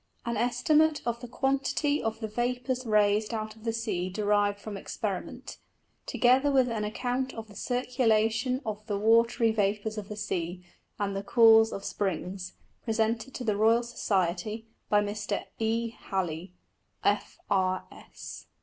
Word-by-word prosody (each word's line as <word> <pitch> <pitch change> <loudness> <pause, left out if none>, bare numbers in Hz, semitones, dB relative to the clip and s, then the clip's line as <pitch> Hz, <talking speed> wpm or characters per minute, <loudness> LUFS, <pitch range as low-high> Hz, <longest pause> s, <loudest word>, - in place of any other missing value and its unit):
_An 235 0 -1
Estimate 300 +7 +3
of 235 -1 -1
the 245 - -8
Quantity 275 +3 0
of 225 0 -3
the 220 - -2
Vapours 245 +3 -2
raised 210 +1 +3
out 215 0 -4
of 220 +1 -16
the 225 - +1
Sea 185 -5 -2
derived 205 +1 +1
from 210 0 -7
Experiment: 195 - -5 0.5
Together 260 +4 +4
with 260 -2 +4
an 225 -2 -2
Account 250 +4 -2
of 225 -1 -7
the 205 - -15
Circulation 245 0 +1
of 215 -1 -4
the 205 -3 -1
watry 230 +2 +4
Vapours 210 +1 0
of 205 - -9
the 210 - -5
Sea, 180 -3 -3 0.4
and 200 -1 0
of 195 - -3
the 200 0 -6
Cause 225 -1 +7
of 195 - -6
Springs, 185 -1 -3 0.3
presented 225 +2 -1
to 255 - -4
the 215 -3 +1
Royal 225 +3 +4
Society. 210 -1 -1 0.2
By 205 0 +4
Mr. 205 0 -3 0.2
_E. 225 +1 0
Halley, 180 -4 -4 0.5
F. - - 0
R. 185 -1 +1
S. - - -10
220 Hz, 155 wpm, -29 LUFS, 205-240 Hz, 0.5 s, Cause